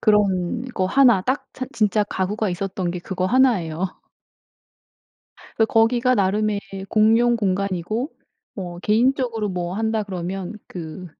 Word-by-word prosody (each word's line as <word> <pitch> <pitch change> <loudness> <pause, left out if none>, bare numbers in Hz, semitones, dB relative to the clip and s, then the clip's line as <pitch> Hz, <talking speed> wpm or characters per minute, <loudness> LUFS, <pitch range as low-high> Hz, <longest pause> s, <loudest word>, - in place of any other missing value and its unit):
그런 205 0 +2
거 185 - +1
1 240 -2 +5
딱 260 +7 -1
찬 255 0 -5
진짜 210 -1 +2
가구가 205 +1 -2
있었던 185 0 -3
게 180 - -4
그거 185 +1 -3
1 250 -4 +4
예요. 165 +3 -2 1.7
그래 225 - +3
거기가 235 +3 +3
나름의 205 +1 +1 0.3
공용 225 +3 +4
공간이고 200 - -1 0.4
뭐 175 -3 -6
개인적으로 230 0 +1
뭐 180 -1 -3
한다 220 0 0
그러면 185 0 -5
그 175 +1 -8
205 Hz, 240 characters per minute, -22 LUFS, 185-225 Hz, 1.7 s, 1